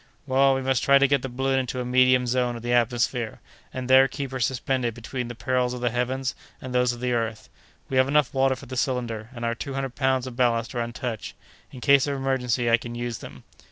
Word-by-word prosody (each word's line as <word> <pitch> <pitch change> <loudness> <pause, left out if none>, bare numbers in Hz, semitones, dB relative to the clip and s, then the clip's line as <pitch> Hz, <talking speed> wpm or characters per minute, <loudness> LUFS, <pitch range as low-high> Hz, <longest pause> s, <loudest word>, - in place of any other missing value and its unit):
"Well, 135 0 +3
we 135 - -2
must 130 -2 +1
try 140 0 +5
to 140 0 +4
get 140 -1 +2
the 135 - -4
balloon 135 +2 0
into 130 0 -3
a 125 - -3
medium 130 0 +4
zone 125 0 0
of 115 - -8
the 120 0 0
atmosphere, 120 -1 0 0.3
and 130 -1 -5
there 130 +1 +7
keep 135 -1 -5
her 130 - -4
suspended 125 -1 -1
between 125 +1 -5
the 120 - -7
perils 125 +1 0
of 125 - -7
the 120 -1 +1
heavens 125 +2 -1 0.3
and 130 -1 -7
those 125 0 +3
of 120 0 -8
the 125 -1 0
earth. 115 -2 -3 0.4
We 130 - -2
have 130 0 +4
enough 145 -1 +2
water 135 0 +2
for 135 - -12
the 130 0 -7
cylinder, 115 -3 -2
and 120 -2 -6
our 115 - 0
two 135 +3 -6
hundred 135 -2 -3
pounds 130 -2 +1
of 130 -2 -7
ballast 120 -2 +1
are 120 - -1
untouched. 120 -1 -5 0.4
In 130 - -10
case 140 +1 +5
of 140 - -1
emergency 130 -3 0
I 115 0 +5
can 120 0 -8
use 120 -1 -4
them." - - -11
125 Hz, 240 wpm, -25 LUFS, 120-130 Hz, 0.4 s, there